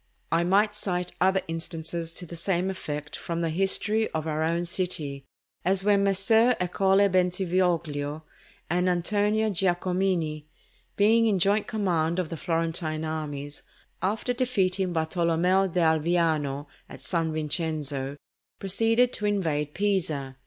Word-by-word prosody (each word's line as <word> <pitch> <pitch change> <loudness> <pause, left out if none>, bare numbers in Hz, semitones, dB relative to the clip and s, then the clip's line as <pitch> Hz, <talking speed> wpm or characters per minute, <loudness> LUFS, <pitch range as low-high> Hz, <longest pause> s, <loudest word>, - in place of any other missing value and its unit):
I 165 +1 +3
might 205 +4 +3
cite 180 -4 -2
other 190 +1 +3
instances 165 0 -4
to 175 - -6
the 170 - -9
same 180 +2 0
effect 150 -5 -5
from 170 -1 -4
the 165 -1 0
history 205 +5 +1
of 160 -1 -2
our 155 -1 -1
own 170 +2 0
city, 160 -6 -3 0.4
as 190 +2 +2
when 200 -1 +3
Messer 220 +5 +4
Ercole 190 +2 +3
Bentivoglio 175 -5 0 0.4
and 180 +2 +1
Antonio 210 +4 +1
Giacomini, 180 -4 0 0.5
being 225 +3 +4
in 205 -3 +2
joint 200 +3 +2
command 175 -6 0
of 180 -4 -1
the 165 - -4
Florentine 165 -1 -2
armies, 145 -2 -5 0.4
after 215 +6 -1
defeating 195 -7 0
Bartolommeo 170 +3 +2
d'Alviano 160 -4 +1 0.2
at - - -11
San 160 +4 -1
Vincenzo, 150 -3 -2 0.4
proceeded 225 +5 +2
to 210 - -2
invest 155 -8 -1
Pisa. 165 -10 -1
175 Hz, 125 wpm, -27 LUFS, 160-195 Hz, 0.5 s, Messer